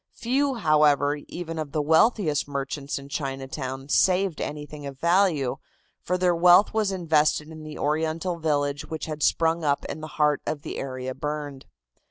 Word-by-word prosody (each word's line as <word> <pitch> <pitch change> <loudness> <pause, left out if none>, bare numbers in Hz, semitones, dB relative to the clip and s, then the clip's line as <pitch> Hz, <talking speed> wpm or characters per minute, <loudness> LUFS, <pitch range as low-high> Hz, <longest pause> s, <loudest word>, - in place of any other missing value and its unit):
Few, 270 +3 0
however, 150 - +3
even 165 -2 -6
of 145 -3 -5
the 155 - 0
wealthiest 160 - +3
merchants 140 0 -4
in 140 0 -9
Chinatown, 135 -1 -5
saved 185 +2 +2
anything 150 0 -6
of 135 -1 -9
value, 170 -6 +2 0.4
for 180 - -1
their 180 -1 +2
wealth 180 +4 +6
was 215 -2 +1
invested 155 -4 +1
in 160 -1 -10
the 155 -1 -8
Oriental 160 +3 -1
village 145 -2 0
which 160 -1 -5
had 155 -1 -6
sprung 165 +2 +2
up 140 -2 0
in 155 - -6
the 155 - -6
heart 150 -1 +2
of 145 -2 -3
the - - -5
area 130 -1 -4
burned. 145 -1 -5
155 Hz, 165 wpm, -25 LUFS, 145-170 Hz, 0.4 s, wealth